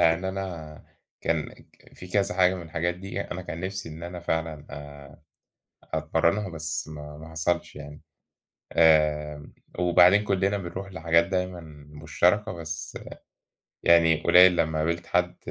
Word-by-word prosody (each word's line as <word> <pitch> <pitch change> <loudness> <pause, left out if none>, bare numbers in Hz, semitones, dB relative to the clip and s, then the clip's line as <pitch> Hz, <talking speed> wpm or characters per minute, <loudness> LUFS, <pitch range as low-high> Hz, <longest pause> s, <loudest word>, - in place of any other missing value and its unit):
يعني 85 +3 +3
أنا 90 -5 -6 0.4
كان 80 -2 -1
ك - - -21
في 90 - -11
كذا 100 +2 0
حاجة 90 0 +4
من 90 - -6
الحاجات 85 +1 -2
دي 95 +2 -6
أنا 95 -2 -5
كان 85 -2 -7
نَفْسي 95 0 -5
إن 80 +1 -10
أنا 85 0 -6
فعلًا 80 -3 -3
آآ 70 0 -11 0.7
أتمرَّنها، 80 +6 +1
بس 80 -2 -4
ما 75 -1 -9
ما 80 +1 -11
حصلش 80 +2 -2
يعني. 75 0 -10 0.7
آمم 75 -2 +2 0.3
وبعدين 90 +3 +5
كُلّنا 100 0 +1
بنروح 95 +1 -7
لحاجات 85 -2 +2
دايمًا 90 -2 -2 0.3
مشتركة، 85 +8 +1
بس 80 -2 -6 0.9
يعني 85 -2 +5
قليّل 90 0 +7
لمّا 80 -1 0
قابلت 85 +2 -1
حد 90 0 0
85 Hz, 140 wpm, -26 LUFS, 80-90 Hz, 0.9 s, قليّل